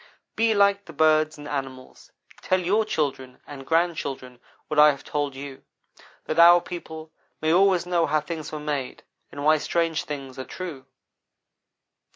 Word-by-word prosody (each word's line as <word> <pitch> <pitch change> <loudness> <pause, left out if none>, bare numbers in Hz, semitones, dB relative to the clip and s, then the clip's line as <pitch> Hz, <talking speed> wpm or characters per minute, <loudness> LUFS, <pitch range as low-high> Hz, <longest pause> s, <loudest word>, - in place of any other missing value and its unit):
Be 225 -1 +2
like 200 0 +3
the 165 - -12
birds 155 0 +2
and 145 0 -10
animals 135 -3 -7 0.3
tell 185 - +1
your 200 +5 +1
children 135 -8 -3
and 135 -2 -10
grandchildren 145 -7 -1 0.3
what 155 - 0
I 150 0 +8
have 140 -2 -3
told 145 -2 -3
you, 135 0 -9 0.6
that 155 - -2
our 175 +1 +8
people 160 -3 -9 0.3
may 155 +1 +1
always 185 -1 +3
know 175 -2 +1
how 155 - +2
things 155 0 -6
were 155 - -5
made, 145 -4 -4 0.3
and 145 0 -6
why 155 0 +4
strange 165 0 -1
things 135 -3 -7
are 130 - -5
true. 155 -8 -8
155 Hz, 160 wpm, -24 LUFS, 140-170 Hz, 0.6 s, I